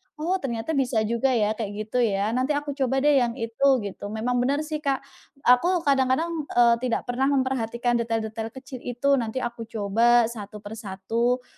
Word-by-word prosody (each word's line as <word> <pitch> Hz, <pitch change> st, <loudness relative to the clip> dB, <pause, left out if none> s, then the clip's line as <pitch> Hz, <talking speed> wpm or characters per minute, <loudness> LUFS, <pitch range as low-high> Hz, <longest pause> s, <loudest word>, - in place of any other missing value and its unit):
Oh 340 Hz, +5 st, -1 dB
ternyata 235 Hz, -1 st, -3 dB
bisa 255 Hz, -7 st, +1 dB
juga 235 Hz, +4 st, 0 dB
ya 215 Hz, -2 st, +2 dB
kayak 215 Hz, -2 st, -4 dB
gitu 215 Hz, +4 st, -2 dB
ya, 205 Hz, -3 st, +1 dB
nanti 255 Hz, +5 st, 0 dB
aku 290 Hz, 0 st, -2 dB
coba 270 Hz, -1 st, 0 dB
deh 295 Hz, -2 st, +5 dB
yang 240 Hz, -2 st, 0 dB
itu 230 Hz, +2 st, -2 dB, 0.2 s
gitu. 200 Hz, 0 st, -6 dB
Memang 225 Hz, +4 st, -1 dB
benar 280 Hz, +5 st, +1 dB
sih 305 Hz, 0 st, -4 dB
Kak, 275 Hz, -3 st, -1 dB, 0.4 s
aku 335 Hz, +8 st, +4 dB
kadang-kadang, 275 Hz, +3 st, +2 dB, 0.2 s
eee, 235 Hz, -1 st, +6 dB
tidak 245 Hz, -1 st, -1 dB
pernah 255 Hz, +2 st, 0 dB
memperhatikan 245 Hz, -3 st, 0 dB
detail-detail 225 Hz, -1 st, -2 dB
kecil 265 Hz, -1 st, -9 dB
itu 245 Hz, +3 st, -4 dB
nanti 235 Hz, +3 st, -3 dB
aku 235 Hz, -1 st, -5 dB
coba 230 Hz, +3 st, +3 dB
satu 210 Hz, -2 st, -9 dB
per 215 Hz, +2 st, -8 dB
satu, 230 Hz, +5 st, -1 dB
240 Hz, 175 wpm, -25 LUFS, 225-270 Hz, 0.4 s, eee